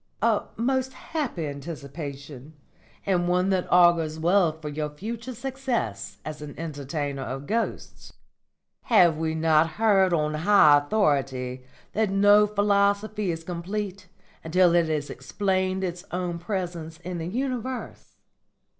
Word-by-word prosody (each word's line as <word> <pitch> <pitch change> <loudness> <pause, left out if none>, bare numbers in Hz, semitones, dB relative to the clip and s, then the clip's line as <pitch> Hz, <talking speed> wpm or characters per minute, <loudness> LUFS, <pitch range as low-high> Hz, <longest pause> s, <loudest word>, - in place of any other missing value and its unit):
"A 225 -2 +2
most 260 +3 0
happy 260 - -4
anticipation, 140 -1 -8 0.5
and 180 -3 +1
one 180 +2 +2
that 185 -2 0
augurs 170 -3 +4
well 175 +1 +3
for 155 -1 -10
your 150 0 -3
future 230 +10 -6
success 235 - -3
as 155 -1 -6
an 150 -1 -8
entertainer 145 -3 -4
of 135 +2 -5
ghosts. 230 +8 -3 0.7
Have 180 -9 +5
we 160 0 -1
not 160 0 +3
heard 200 -4 +3
on 155 -2 +1
high 155 -3 +6
authority 135 -7 -1 0.3
that 215 -1 +1
no 205 +2 +5
philosophy 205 0 +1
is 165 -1 -3
complete 185 +3 -5 0.4
until 175 +1 +3
it 170 -1 +3
has 150 -2 -2
explained 190 -1 -1
its 175 -1 -4
own 175 -1 -3
presence 175 -3 -4
in 175 0 -5
the 165 - -4
universe? 255 +3 -4
175 Hz, 130 wpm, -25 LUFS, 155-205 Hz, 0.7 s, high